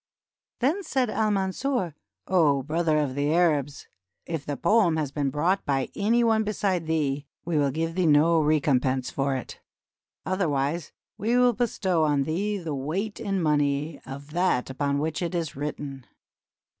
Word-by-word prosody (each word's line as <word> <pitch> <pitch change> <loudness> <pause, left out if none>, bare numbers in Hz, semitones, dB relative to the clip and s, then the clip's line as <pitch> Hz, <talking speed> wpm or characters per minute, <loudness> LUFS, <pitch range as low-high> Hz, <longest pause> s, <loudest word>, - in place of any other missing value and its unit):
Then 305 +11 +2
said 260 - 0
Al 215 0 +1
Mansur: 195 - -1 0.3
"O 150 -7 +3
brother 160 +2 +1
of 145 -3 0
the 145 +2 0
Arabs! 150 -5 +1 0.4
if 165 -4 -4
the 145 -1 -4
poem 175 -3 +3
has 150 -3 -2
been 140 -1 -1
brought 170 +8 +1
by 135 -2 0
any 230 +4 +2
one 220 -1 +3
beside 195 -5 -1
thee, 145 -3 -1 0.2
we 170 - -3
wiU 140 -2 +2
give 165 +3 -2
thee 180 -1 +1
no 160 +2 +5
recompense 135 -4 +1
for 135 0 0
it; 130 - -6 0.7
otherwise 160 -4 -1 0.3
we 230 +4 +1
will 250 -1 +5
bestow 190 -7 0
on 145 -2 +2
thee 200 +8 -1
the 165 -5 -4
weight 170 +11 -3
in 195 -2 -1
money 145 0 0
of 140 +2 -9
that 170 -7 +1
upon 140 +1 -1
which 155 +3 -2
it 175 0 -2
is 165 -3 -2
written." 140 -2 -5
160 Hz, 160 wpm, -26 LUFS, 145-190 Hz, 0.7 s, no